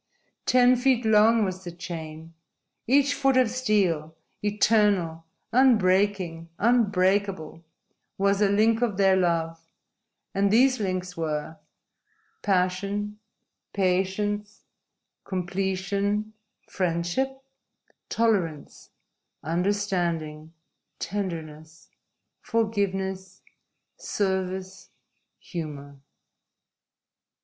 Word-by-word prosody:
Ten 250 0 +5
feet 250 -2 +2
long 220 +1 +5
was 185 0 -5
the 175 - -6
chain. 165 -2 -8 0.5
Each 280 +3 +4
foot 270 -2 +2
of 250 -3 +3
steel 190 -11 0 0.3
eternal, 205 -6 +2 0.3
unbreaking, 190 -8 +2
unbreakable 195 -7 +1 0.5
was 200 +1 +2
a 205 - +4
link 220 +3 +3
of 225 -6 0
their 195 -1 +4
love, 165 -3 0 0.7
and 200 +1 +2
these 255 +4 +4
links 185 -2 -3
were: 160 -1 -3 0.8
Passion, 200 +2 -1 0.5
patience, 205 +2 -1 0.6
completion, 195 +3 -2 0.3
friendship, 185 +10 -1 0.7
tolerance, 190 -10 -1 0.5
understanding, 170 -3 -1 0.5
tenderness, 160 -5 -6 0.5
forgiveness, 195 -5 -2 0.6
service, 190 -1 -3 0.5
humor." 145 -5 -7
190 Hz, 70 wpm, -26 LUFS, 170-210 Hz, 0.8 s, Ten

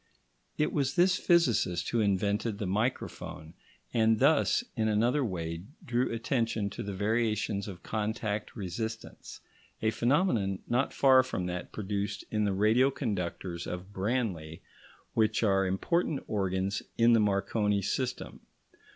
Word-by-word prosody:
It 150 - +1
was 140 -3 0
this 185 +1 +4
physicist 120 - +2
who 120 - +1
invented 100 +1 +1
the 105 - -3
microphone, 95 -6 -3 0.4
and 110 -1 +3
thus, 150 - +3
in 110 -1 +1
another 120 +7 +2
way, 85 -6 -3 0.2
drew 120 +1 0
attention 115 -3 -1
to 120 - -6
the 100 -3 -5
variations 105 -1 0
of 95 -4 -9
contact 110 -1 -3
resistance, 110 +3 -6 0.4
a 110 - +1
phenomenon 120 - +1
not 125 +3 +1
far 130 -1 +6
from 130 -8 -3
that 90 0 -5
produced 100 0 -3
in 105 -1 +1
the 100 - +1
radio 110 +7 +4
conductors 90 - -3
of 90 +3 -6
Branly, 95 -7 -2 0.5
which 110 0 +2
are 95 -2 +3
important 150 - 0
organs 95 -1 -1 0.2
in 115 +1 +5
the 115 - +5
Marconi 105 0 +1
system. 125 +6 -3
105 Hz, 135 wpm, -30 LUFS, 95-120 Hz, 0.5 s, far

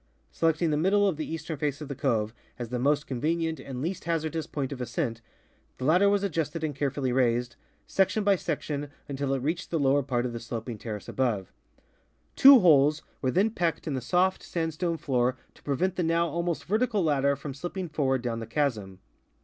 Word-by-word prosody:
Selecting 165 0 +1
the 150 - +1
middle 200 +5 +3
of 190 - +1
the 155 +1 -5
eastern 160 -1 -4
face 145 0 -2
of 150 - -7
the 140 - -4
cove 115 -5 0 0.2
as 120 -2 -5
the 125 0 -2
most 145 +3 +2
convenient 160 +5 -1
and 130 -1 -6
least 185 +3 -3
hazardous 160 -1 -1
point 140 -2 -3
of 130 -2 -5
ascent, 120 -1 -2 0.6
the 130 - -4
ladder 180 +7 +5
was 200 0 +2
adjusted 165 -3 -2
and 150 -3 -2
carefully 135 -2 -1
raised, 120 -1 +1 0.3
section 195 +2 +1
by 200 -1 +4
section, 145 -4 -3 0.2
until 140 -1 -2
it 135 -2 -1
reached 165 +5 -2
the 165 - 0
lower 140 0 +3
part 125 -3 -1
of 120 - -3
the 115 - -4
sloping 115 -1 -6
terrace 105 -3 -6
above. 115 -8 -1 0.8
Two 270 -3 +9
holes 150 -3 +5 0.2
were 130 - +1
then 195 +10 +2
pecked 170 -7 -1
in 155 - -2
the 130 - -2
soft 180 +8 +1
sandstone 165 0 -2
floor 130 -3 0 0.2
to - - -21
prevent 175 +7 -1
the - - +1
now 170 0 +2
almost 170 +1 -2
vertical 215 0 +1
ladder 140 -2 +2
from 140 0 -7
slipping 175 +6 -5
forward 135 -5 0
down 115 -2 -2
the 115 - -6
chasm. 110 -8 -1
150 Hz, 200 wpm, -28 LUFS, 130-170 Hz, 0.8 s, Two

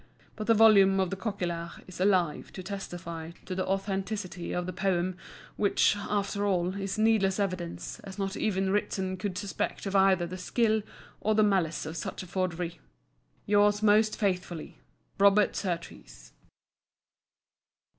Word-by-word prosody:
But 215 -1 -5
the 230 - +5
volume 200 -3 +6
of 190 -2 0
Coquillart 175 -5 -4
is 185 - -11
alive 185 -6 +1
to 185 - -7
testify 170 -4 -6
to - - -4
the 185 0 -2
authenticity 195 -2 -3
of 180 0 -2
the 185 - -4
poem; 185 -1 0 0.4
which, 205 0 +3
after 205 0 -2
all, 185 -2 +1
is 195 +1 -3
needless 215 -3 +3
evidence, 185 -4 -3
as 195 0 -10
not 195 -1 -2
even 190 -2 0
Ritson 190 -2 -1
could 185 -1 -3
suspect 195 +2 -3
of 195 0 -2
either 190 -2 +4
the 185 +2 -7
skill 220 +3 +1 0.4
or 215 0 +1
the 215 - +5
malice 185 -7 +1
of 160 +1 -6
such 170 - -5
a - - -9
forgery, 175 -2 -3 0.7
Yours 205 0 +3
most 215 +1 +4
faithfully, 180 -5 -2 0.4
ROBERT 200 +1 +5
SURTEES. 165 - -5
190 Hz, 145 wpm, -29 LUFS, 180-205 Hz, 0.7 s, volume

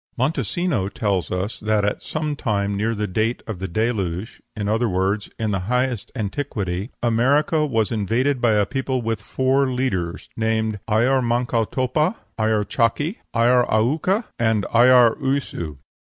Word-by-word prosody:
Montesino 135 - 0
tells 100 -5 -1
us 95 +4 -3
that 105 -1 +1
at 105 - -1
some 155 -1 -3
time 100 -7 -1
near 110 +3 0
the 105 0 -1
date 110 +5 -1
of 110 -6 -6
the 95 - -3
Deluge, 100 -1 -2
in 105 -2 -3
other 115 +2 +1
words, 95 +3 0
in 110 -2 -1
the 95 - 0
highest 125 -3 0
antiquity, 100 -4 -3
America 140 +7 +2
was 115 -5 0
invaded 120 +5 0
by 120 -2 +4
a 105 -1 +3
people 130 0 -2
with 115 -1 -2
four 130 +5 +1
leaders, 100 -10 -2
named 110 -1 0
Ayar 125 +5 +3
manco 120 -1 +1
topa, 145 - 0 0.2
Ayar 110 -1 +2
chaki, 145 - 0 0.2
Ayar 120 +2 +4
aucca, 155 - +1 0.2
and 110 -3 +2
Ayar 120 -1 +6
uyssu. 130 - -2
115 Hz, 150 wpm, -22 LUFS, 105-130 Hz, 0.2 s, Ayar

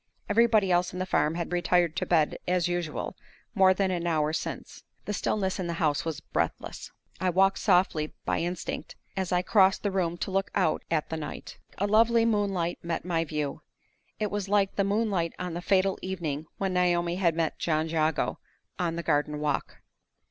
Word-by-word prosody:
Everybody 215 -3 +4
else 175 0 +2
in - - -5
the 185 - -1
farm 155 -3 +1
had 170 0 -3
retired 175 -1 +2
to - - -1
bed, 160 -4 +2
as 180 -1 +2
usual, 175 -3 -3 0.4
more 190 -3 +6
than 190 0 +1
an 175 -1 -2
hour 155 -2 +1
since. - - -5 0.2
The 210 - -2
stillness 195 -1 -1
in 180 - -2
the 170 - -2
house 155 -3 +1
was 160 -4 -3
breathless. - - -3 0.3
I 185 +1 +1
walked 195 +2 +3
softly, 180 -5 +2
by - - 0
instinct, 175 +1 -4 0.2
as 190 -2 -2
I 180 0 +2
crossed 190 -1 +4
the 205 - 0
room 175 -3 0
to 190 - -3
look 195 +1 0
out 180 -5 +2
at 155 -2 0
the 160 - -3
night. 150 - -7 0.2
A 200 - 0
lovely 230 +2 +4
moonlight 200 -6 0
met 170 0 -3
my 165 -2 +1
view; 150 -3 -3 0.6
it 210 -2 -1
was 205 -1 -3
like 200 -1 +2
the 200 - +2
moonlight 200 -4 0
on 180 -2 -4
the 175 - -4
fatal 190 +1 +2
evening 160 -5 -3
when 195 -1 -1
Naomi 175 -1 +1
had 170 -4 +2
met 165 -1 -1
John 155 -1 0
Jago 160 -1 0 0.4
on 170 -2 0
the 170 - -4
garden 150 -1 0
walk. 150 -1 -2
180 Hz, 190 wpm, -28 LUFS, 165-195 Hz, 0.6 s, more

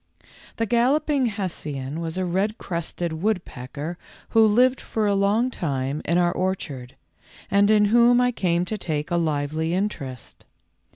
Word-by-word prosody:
The 225 - 0
Galloping 265 +4 +2
Hessian 160 - -4
was 165 +1 -4
a 185 - 0
red 195 +5 -1
crested 170 -2 -4
woodpecker 170 - -3 0.3
who 225 -1 +5
lived 250 +5 +3
for 220 -1 -2
a 205 - +2
long 205 +6 +2
time 140 - -2
in 170 - +1
our 175 -1 +3
orchard, 160 -10 -3 0.6
and 200 +1 +4
in 210 -1 +5
whom 240 +3 +5
I 250 0 +3
came 175 -6 0
to 215 +3 -4
take 155 -2 -3
a 175 - +2
lively 160 +1 -1
interest. 140 - -4
185 Hz, 150 wpm, -24 LUFS, 160-215 Hz, 0.6 s, who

